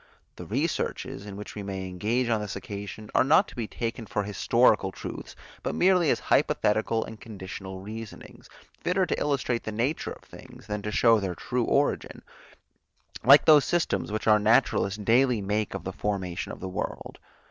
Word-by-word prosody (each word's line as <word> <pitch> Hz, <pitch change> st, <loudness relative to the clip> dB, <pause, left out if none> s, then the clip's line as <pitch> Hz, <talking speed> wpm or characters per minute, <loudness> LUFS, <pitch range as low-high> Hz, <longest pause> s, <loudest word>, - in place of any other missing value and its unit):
The -, -, -9 dB
researches, 100 Hz, -, -2 dB
in 100 Hz, -1 st, -7 dB
which 105 Hz, -, -8 dB
we 105 Hz, -, -6 dB
may 95 Hz, -1 st, -5 dB
engage 110 Hz, +7 st, -1 dB
on 110 Hz, -2 st, +1 dB
this 105 Hz, -2 st, -5 dB
occasion, 105 Hz, +1 st, -7 dB
are -, -, +5 dB
not 155 Hz, +9 st, +4 dB
to -, -, -14 dB
be 115 Hz, -3 st, -3 dB
taken 115 Hz, 0 st, -4 dB
for 105 Hz, -, -1 dB
historical 100 Hz, -1 st, +2 dB
truths, -, -, -8 dB, 0.3 s
but -, -, -3 dB
merely 180 Hz, -4 st, +4 dB
as -, -, +2 dB
hypothetical 110 Hz, +2 st, +1 dB
and 110 Hz, -1 st, -11 dB
conditional 95 Hz, -3 st, -8 dB
reasonings, 110 Hz, +2 st, -9 dB, 0.3 s
fitter 185 Hz, +1 st, +1 dB
to -, -, -2 dB
illustrate 130 Hz, -5 st, 0 dB
the 110 Hz, -, -5 dB
nature 120 Hz, +8 st, -1 dB
of -, -, -16 dB
things, -, -, -14 dB
than 105 Hz, -1 st, -4 dB
to 105 Hz, -, -4 dB
show 115 Hz, 0 st, +4 dB
their 95 Hz, -3 st, -3 dB
true 125 Hz, +4 st, -2 dB
origin, 145 Hz, +1 st, 0 dB, 1.0 s
like 140 Hz, +4 st, +8 dB
those 150 Hz, -3 st, +7 dB
systems, 175 Hz, -10 st, 0 dB
which 110 Hz, -, -3 dB
our 105 Hz, -1 st, +5 dB
naturalists 105 Hz, -2 st, +2 dB
daily 120 Hz, +3 st, +3 dB
make 105 Hz, +1 st, -2 dB
of -, -, -5 dB
the -, -, -5 dB
formation 95 Hz, -4 st, -3 dB
of -, -, -10 dB
the 95 Hz, -, -4 dB
world. 90 Hz, -, -5 dB
110 Hz, 180 wpm, -27 LUFS, 100-125 Hz, 1.0 s, like